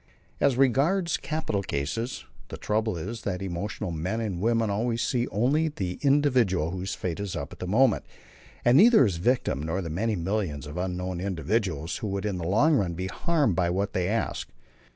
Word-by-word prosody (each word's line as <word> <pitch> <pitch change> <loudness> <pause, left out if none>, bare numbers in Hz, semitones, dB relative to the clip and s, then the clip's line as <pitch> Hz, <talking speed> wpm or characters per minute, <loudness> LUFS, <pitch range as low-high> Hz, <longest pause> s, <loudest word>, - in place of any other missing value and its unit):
As 135 -3 +3
regards 145 - +3
capital 155 -10 -2
cases, 95 - -3 0.2
the - - -7
trouble 110 -2 -1
is 110 +8 -5
that 95 -1 -3
emotional 95 0 -4
men 90 +7 -2
and 100 -6 -3
women 115 -1 +2
always 115 +3 0
see 120 -1 0
only 135 +10 +1
the 95 - -4
individual 125 - +3
whose 95 +1 -4
fate 90 -1 -4
is 100 -2 -4
up - - -5
at - - -14
the 90 - -4
moment, 115 +3 +3 0.6
and 120 +2 +6
neither 225 - +7
his 95 -6 -1
victim 100 - +1
nor 80 +4 -2
the 85 -4 -4
many 110 +6 0
millions 90 -5 -2
of 75 +1 -8
unknown 90 0 -3
individuals 90 - -1
who 110 - -4
would 100 0 -3
in 100 -4 -2
the 85 - -3
long 125 - +4
run 90 -6 -1
be 90 +2 -3
harmed 145 - +1
by 90 -2 +1
what 100 +3 -1
they 90 -1 0
ask. 110 +3 -2
100 Hz, 190 wpm, -27 LUFS, 90-120 Hz, 0.6 s, neither